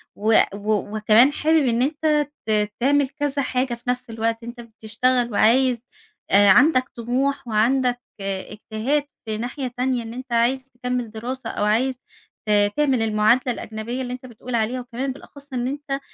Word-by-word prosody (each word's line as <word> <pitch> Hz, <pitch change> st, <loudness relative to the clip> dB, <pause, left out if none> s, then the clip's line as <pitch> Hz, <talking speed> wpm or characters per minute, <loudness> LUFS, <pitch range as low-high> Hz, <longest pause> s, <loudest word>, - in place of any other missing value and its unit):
وأ 215 Hz, -1 st, +3 dB
و 210 Hz, 0 st, -2 dB
وكمان 220 Hz, +6 st, +5 dB
حابب 310 Hz, -1 st, +2 dB
إن 235 Hz, +1 st, +1 dB
أنت 300 Hz, +1 st, +1 dB, 0.2 s
ت 210 Hz, -1 st, +1 dB
تعمل 280 Hz, +1 st, +2 dB
كذا 285 Hz, -1 st, -2 dB
حاجة 255 Hz, -1 st, -1 dB
في 235 Hz, 0 st, -8 dB
نفس 250 Hz, -1 st, -2 dB
الوقت، 225 Hz, +1 st, -2 dB
أنت 240 Hz, +1 st, -8 dB
بتشتغل 235 Hz, +2 st, -1 dB
وعايز، 245 Hz, +4 st, +4 dB, 0.5 s
آآ، 200 Hz, 0 st, +6 dB
عندك 255 Hz, +4 st, +5 dB
طموح 250 Hz, +3 st, -1 dB
وعندك 245 Hz, +3 st, +2 dB, 0.2 s
اجتهاد 215 Hz, +8 st, -2 dB, 0.2 s
في 215 Hz, -1 st, -3 dB
ناحية 250 Hz, +3 st, -4 dB
تانية، 250 Hz, -1 st, 0 dB
إن 225 Hz, -, -8 dB
أنت 255 Hz, 0 st, -9 dB
عايز 250 Hz, +3 st, +2 dB
تكمل 250 Hz, -2 st, -3 dB
دراسة 240 Hz, +2 st, -5 dB
أو -, -, -2 dB
عايز 250 Hz, +5 st, +2 dB, 0.5 s
ت 205 Hz, -1 st, +4 dB
تعمل 275 Hz, -5 st, +2 dB
المعادلة 225 Hz, +4 st, +3 dB
الأجنبية 225 Hz, +4 st, -5 dB
اللي 250 Hz, -1 st, -4 dB
أنت 255 Hz, +1 st, -8 dB
بتقول 240 Hz, 0 st, -6 dB
عليها، 230 Hz, +3 st, 0 dB
وكمان 250 Hz, +2 st, -4 dB
بالأخص 280 Hz, 0 st, -14 dB
إن 245 Hz, 0 st, -1 dB
أنت 280 Hz, 0 st, -3 dB
245 Hz, 160 wpm, -22 LUFS, 220-265 Hz, 0.5 s, آآ